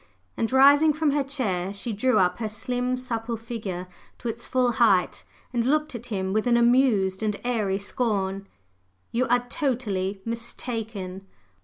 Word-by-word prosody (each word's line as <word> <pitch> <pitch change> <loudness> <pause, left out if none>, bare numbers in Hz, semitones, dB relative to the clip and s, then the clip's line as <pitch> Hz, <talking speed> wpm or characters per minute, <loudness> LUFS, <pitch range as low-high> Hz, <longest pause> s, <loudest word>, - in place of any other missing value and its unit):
And 225 - -1
rising 285 +4 +6
from 305 -1 +1
her 285 0 +1
chair, 200 -10 -1
she 215 +3 -3
drew 255 +5 +2
up 180 +1 +2
her 220 -2 -2
slim 250 +3 -2
supple 235 -2 -3
figure 215 -6 -5 0.3
to 240 - -4
its 230 +1 -5
full 250 -1 +2
height 210 -6 +2 0.3
and 235 -1 +1
looked 300 +4 +1
at 235 0 -7
him 190 -4 -2
with 215 +3 +1
an 240 -1 +4
amused 235 -6 +3
and 210 -2 -1
airy 215 -6 0
scorn. 200 -3 -2 0.6
"You 250 +2 +1
are 245 +1 +2
totally 210 -8 -1
mistaken! 225 -5 -5
230 Hz, 155 wpm, -25 LUFS, 200-250 Hz, 0.6 s, rising